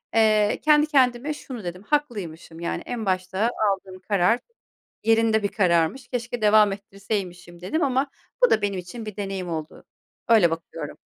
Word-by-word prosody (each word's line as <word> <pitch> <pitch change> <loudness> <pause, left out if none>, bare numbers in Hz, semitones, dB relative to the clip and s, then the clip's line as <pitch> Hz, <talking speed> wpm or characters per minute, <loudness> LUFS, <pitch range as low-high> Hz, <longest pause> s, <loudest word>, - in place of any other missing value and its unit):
eee, 215 -2 +4
kendi 300 0 +5
kendime 265 0 +2
şunu 255 -6 -8
dedim: 180 +2 -6
“Haklıymışım.” 205 - -3
Yani, 170 - -3
"En 235 -3 -4
başta 190 +4 0 0.2
aldığım 190 -1 -6
karar 200 +4 +2 0.6
yerinde 225 -1 +3
bir - - +3
kararmış, 175 +4 +1
keşke 240 -1 -4
devam 210 -1 +5
ettirseymişim." 190 -3 -5
dedim 315 - -1
ama 270 0 +1 0.4
bu - - +1
da 220 - +3
benim 200 -2 -1
için 200 +6 -8
bir 215 - -7
deneyim 195 -3 -4
oldu. 160 -1 -6 0.4
Öyle 215 -8 +5
bakıyorum. 165 -2 -6
205 Hz, 150 wpm, -24 LUFS, 180-235 Hz, 0.6 s, kendi